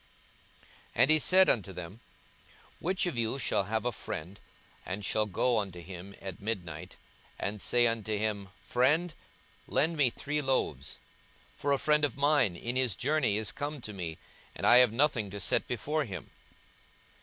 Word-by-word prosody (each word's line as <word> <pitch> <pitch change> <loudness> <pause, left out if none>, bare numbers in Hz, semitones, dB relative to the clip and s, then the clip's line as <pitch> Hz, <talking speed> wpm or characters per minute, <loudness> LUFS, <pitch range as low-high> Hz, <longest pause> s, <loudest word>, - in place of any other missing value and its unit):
42:011:005 - - -26 0.3
And 135 - +5
he 155 - +5
said 185 +5 +6
unto 100 -4 +1
them, 90 +4 -8 0.8
Which 185 +2 0
of 170 -9 -2
you 115 +3 0
shall 100 - 0
have 110 +3 -2
a 125 - +1
friend, 95 -2 -7 0.4
and 100 +2 -5
shall 110 +3 +1
go 115 +4 +1
unto 95 -4 -5
him 90 +3 -9
at 95 -1 -8
midnight, 90 -8 -5 0.4
and 105 0 -4
say 120 0 +3
unto 110 -2 0
him, 105 -2 -2
Friend, 150 +7 +2 0.5
lend 165 +3 +1
me 140 -4 +4
three 145 +5 -3
loaves; 75 - -1 0.6
42:011:006 - - -29
For 145 - +1
a 140 - +4
friend 150 +1 +2
of 140 -3 +1
mine 140 - +3
in 120 +8 -4
his 130 -6 +2
journey 140 -6 +1
is 110 -1 0
come 145 0 -4
to 105 - -7
me, 85 -4 -5 0.4
and - - -4
I 120 - +8
have 125 -3 +6
nothing 120 -4 +1
to 100 +1 -6
set - - +1
before 145 +6 -1
him? 95 -7 -8
115 Hz, 175 wpm, -30 LUFS, 100-140 Hz, 0.8 s, I